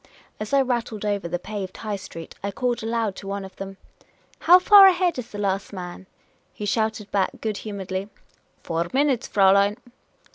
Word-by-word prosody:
As 215 0 -5
I 275 -1 +4
rattled 235 -4 -2
over 200 -4 -1
the 175 +1 -2
paved 190 0 -6
High 215 -2 -4
Street, 165 -4 -9
I 200 - -1
called 240 +4 -2
aloud 225 -3 -1
to 195 - -9
one 200 0 -4
of 190 -1 -13
them. 195 0 -7 0.3
" - - -34
How 360 - +11
far 390 +1 +8
ahead 360 -1 +3
the 240 -5 -7
last 195 -1 -1
man? 185 -1 -8 0.2
" - - -40
He 210 - -5
shouted 220 0 -1
back, 195 -2 0
good 215 -2 -3
humouredly: 195 -2 -5 0.3
" - - -40
Four 165 +1 -2
minutes, 270 -3 +1
Fraulein." 200 +1 +4
205 Hz, 185 wpm, -24 LUFS, 195-235 Hz, 0.3 s, How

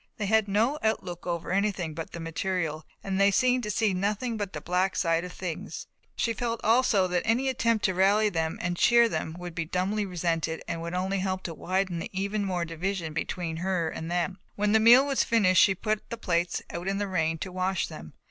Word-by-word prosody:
They 210 - -2
had 220 +1 +3
no 225 +9 +1
outlook 185 -6 -2
over 170 -1 -3
anything 195 -4 0
but 165 +1 -6
the 170 - -7
material 165 -1 -3 0.2
and 195 0 -1
they 200 - +6
seemed 250 +4 +3
to 210 - -4
see 210 -1 +1
nothing 210 +5 -1
but 205 -3 -3
the - - -4
black 185 +2 0
side 165 -1 +1
of 180 - -6
things. 180 -3 -6 0.3
She 230 - 0
felt 230 +1 -2
also 220 -4 +3
that 180 -1 0
any 250 +4 +1
attempt 230 -4 +1
to 190 - +2
rally 200 +4 +4
them 165 -1 -1
and 175 0 -1
cheer 235 +5 +5
them 160 -7 -3
would 175 -1 -7
be 165 - -2
dumbly 185 +5 -1
resented 165 -2 -2
and 165 -1 -3
would 170 +1 -4
only 190 +2 -1
help 185 0 -2
to 170 - -4
widen 185 0 -1
even 200 +2 -2
more 180 -3 -1
the - - -11
division 165 -1 -3
between 165 0 -3
her 180 -2 -1
and 160 +1 -6
them. 180 +2 -1 0.2
When 205 0 +1
the 220 - +5
meal 240 +5 +7
was 275 -1 +1
finished 190 -5 +4
she 195 - +5
put 215 +2 -2
the 235 - -5
plates 175 -4 -1
out 175 +2 -5
in 195 0 0
the 205 0 -1
rain 165 -3 0
to 185 - -6
wash 185 0 0
them. 75 +1 -10
190 Hz, 220 wpm, -27 LUFS, 170-210 Hz, 0.3 s, meal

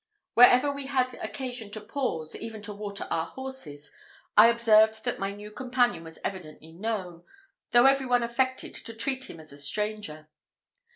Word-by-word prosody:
Wherever 245 +3 +7
we 280 -1 -6
had 255 -2 0
occasion 250 -5 -5
to 215 - -3
pause, 210 - -3
even 225 -2 -7
to 210 0 -5
water 200 -1 -6
our 165 - 0
horses, 265 - -8 0.4
I 215 +2 +9
observed 220 -1 +4
that 245 - -2
my 195 +1 -2
new 205 +1 -10
companion 245 -5 0
was 160 0 -10
evidently 160 -4 -6
known, 180 -3 -4 0.5
though 240 +1 +5
every 270 -1 +4
one 245 -1 +3
affected 260 +2 -1
to 230 - -8
treat 260 +3 -2
him 165 - -10
as 155 -2 -13
a 140 - -7
stranger. 200 -1 -1
220 Hz, 165 wpm, -27 LUFS, 190-250 Hz, 0.5 s, I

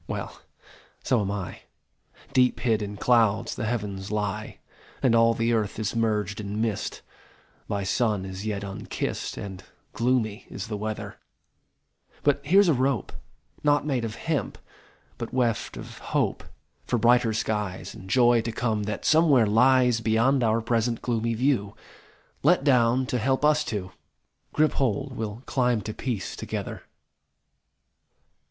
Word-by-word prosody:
Well, - - -5 0.6
so 125 -4 +2
am 100 - -2
I. 100 -3 -4 0.7
Deep 125 -1 +3
hid 110 -4 +2
in 105 0 -5
clouds 115 -1 +2
the 110 - -3
Heavens 100 -4 -3
lie, 105 -2 -3 0.5
And 125 - +4
all 115 0 +5
the 115 +1 +1
earth 110 -3 -1
is 110 0 -2
merged 105 -2 0
in 105 +1 -4
mist 110 -2 -2 0.6
By 100 -1 -2
sun 105 0 0
as 95 +1 -6
yet 105 -2 -3
unkist, 100 -1 -4
And 95 -2 -7 0.3
gloomy 115 -3 0
is 100 - -6
the 105 - -2
weather 110 +1 -5 1.0
But 140 -1 +2
here 190 +7 +6
s 200 - +3
a 165 - +5
rope, 130 -3 0 0.5
Not 145 0 +3
made 135 -5 0
of 110 -1 -4
hemp, 155 -9 -2 0.6
but - - -5
weft 120 -4 0
of - - -9
Hope - - -1 0.4
For 120 - +1
brighter 120 0 +4
skies, 105 -3 -2
And 95 - -11
joy 120 +1 +5
to 115 +1 -3
come 110 -2 -1
that 105 - -4
somewhere 155 -7 +5
lies 125 +2 +4
Beyond 115 +4 +2
our 115 0 +2
present 115 0 0
gloomy 115 -1 0
view, 115 -5 0 0.7
Let 155 0 +4
down 125 -2 +3
to 125 -1 -1
help 130 +5 +1
us 150 0 +4
two! 100 -8 -4 0.6
Grip 155 0 +3
hold! 130 +1 -1
We 115 - -3
ll 105 +4 -8
climb 125 -4 +1
to 110 +2 -5
peace 115 -6 -4
together! - - -5
115 Hz, 150 wpm, -26 LUFS, 105-125 Hz, 1.0 s, here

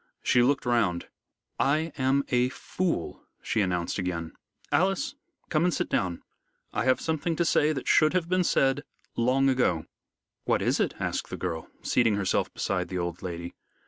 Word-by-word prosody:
She 125 - +4
looked 135 +3 +2
round. 105 -8 +1 0.5
"I 155 +4 +2
am 135 0 +2
a 125 0 +2
fool," 170 - -3 0.2
she 110 - +1
announced 90 -1 -1
again. 85 -3 -3 0.4
"Alice, 195 +8 +1 0.4
come 155 0 +2
and 180 - +3
sit - - -2
down. 90 -2 -1 0.5
I 110 - 0
have 130 0 +3
something 160 +1 -1
to 170 - +1
say 155 -1 +3
that 135 -4 -4
should 155 +1 +5
have 180 -2 +1
been 185 +1 +2
said 135 -3 +2 0.3
long 130 +3 +3
ago." 125 -12 +2 0.6
"What - - +1
is - - +1
it?" - - 0
asked - - -2
the - - -5
girl, 85 -3 -4 0.2
seating 115 -4 +3
herself 100 -2 0
beside - - -1
the 90 - -4
old 85 0 -3
lady. 85 -1 -5
125 Hz, 170 wpm, -27 LUFS, 90-155 Hz, 0.6 s, should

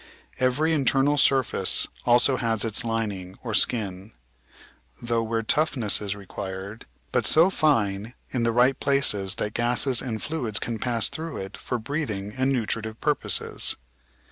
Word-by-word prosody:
Every 135 +6 +2
internal 140 0 +2
surface 130 -8 +2 0.2
also 120 +2 +4
has 115 -3 0
its 115 +2 -2
lining, 105 -5 -3
or 115 -3 -4
skin: 100 -2 0 0.9
tough 120 -1 +1
where 115 0 -1
toughness 125 -5 +1
is 100 -1 -3
required, 95 +1 -7 0.2
but - - +1
so 165 +4 +5
fine 115 - +1 0.2
in 125 - -1
the 115 0 +2
right 125 +3 +3
places 105 -9 +1
that 105 - -3
gases 120 +2 +2
and 115 -4 -4
fluids 125 -9 -2
can 115 -2 -3
pass 115 -3 +1
through 160 +1 -5
it 95 +2 -6
for 125 - -3
breathing 110 -6 -4
and 130 +1 +1
nutri 115 -3 0
tive 110 +1 -7
purposes. 150 -1 0
115 Hz, 145 wpm, -25 LUFS, 105-135 Hz, 0.9 s, so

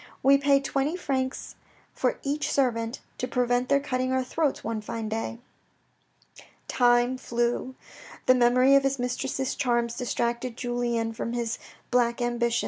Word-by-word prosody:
We 275 +1 +6
pay 280 0 +4
twenty 275 +3 -1
francs 260 -6 -2 0.4
for - - 0
each 290 +2 -1
servant, 235 -3 0 0.2
to 250 - -1
prevent 245 0 0
their 280 - +4
cutting 255 -2 -1
our 260 0 +1
throats 285 +3 -1
one 220 0 -3
fine 220 +1 -5
day. 225 +1 -3 1.3
Time 245 +1 +3
flew. 240 +2 -1 0.5
The 255 - +6
memory 255 +2 +4
of 275 - +7
his 275 0 0
mistress's 250 +2 -2
charms 240 -3 0
distracted 240 0 -2
Julien 240 -2 -1
from 235 +1 -4
his 235 -1 -2 0.3
black 240 -1 +2
ambition. 240 -1 0
245 Hz, 140 wpm, -27 LUFS, 235-265 Hz, 1.3 s, of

